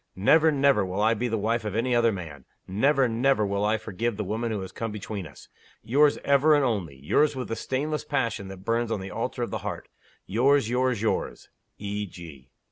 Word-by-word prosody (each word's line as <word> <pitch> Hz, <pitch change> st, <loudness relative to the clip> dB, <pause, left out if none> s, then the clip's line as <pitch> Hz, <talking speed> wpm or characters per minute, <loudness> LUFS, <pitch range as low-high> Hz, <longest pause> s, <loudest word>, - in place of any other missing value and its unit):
Never, 155 Hz, +12 st, +4 dB
never 140 Hz, -6 st, +3 dB
will 95 Hz, +1 st, -4 dB
I 110 Hz, +2 st, +4 dB
be 120 Hz, +2 st, -2 dB
the 115 Hz, -1 st, -1 dB
wife 115 Hz, +3 st, 0 dB
of 105 Hz, -1 st, -4 dB
any 120 Hz, +3 st, 0 dB
other 120 Hz, -1 st, +4 dB
man! 80 Hz, -, -8 dB, 0.2 s
Never, 130 Hz, +7 st, +2 dB
never 120 Hz, -1 st, +2 dB
will 100 Hz, 0 st, -1 dB
I 105 Hz, +1 st, +2 dB
forgive 110 Hz, +1 st, -3 dB
the 105 Hz, -, -2 dB
woman 110 Hz, +4 st, -2 dB
who 105 Hz, -3 st, -2 dB
has 95 Hz, -, -7 dB
come 115 Hz, -1 st, -4 dB
between 105 Hz, -3 st, -6 dB
us! 70 Hz, -, -15 dB, 0.4 s
Yours 145 Hz, +6 st, +3 dB
ever 140 Hz, +2 st, +4 dB
and 145 Hz, -2 st, +3 dB
only; 100 Hz, -, -2 dB
yours 140 Hz, -, +1 dB
with 130 Hz, -2 st, -5 dB
the 115 Hz, -, -2 dB
stainless 150 Hz, +6 st, -2 dB
passion 120 Hz, -9 st, -2 dB
that 95 Hz, 0 st, -10 dB
burns 115 Hz, 0 st, 0 dB
on 105 Hz, -, -1 dB
the 95 Hz, 0 st, -7 dB
altar -, -, -3 dB
of -, -, -4 dB
the -, -, -2 dB
heart; -, -, -6 dB, 0.4 s
yours, 130 Hz, +4 st, +3 dB
yours, 125 Hz, -3 st, +1 dB
yours 110 Hz, -, -2 dB, 0.3 s
E. 105 Hz, 0 st, -4 dB
G." 80 Hz, -8 st, -12 dB
115 Hz, 210 wpm, -26 LUFS, 100-130 Hz, 0.4 s, Never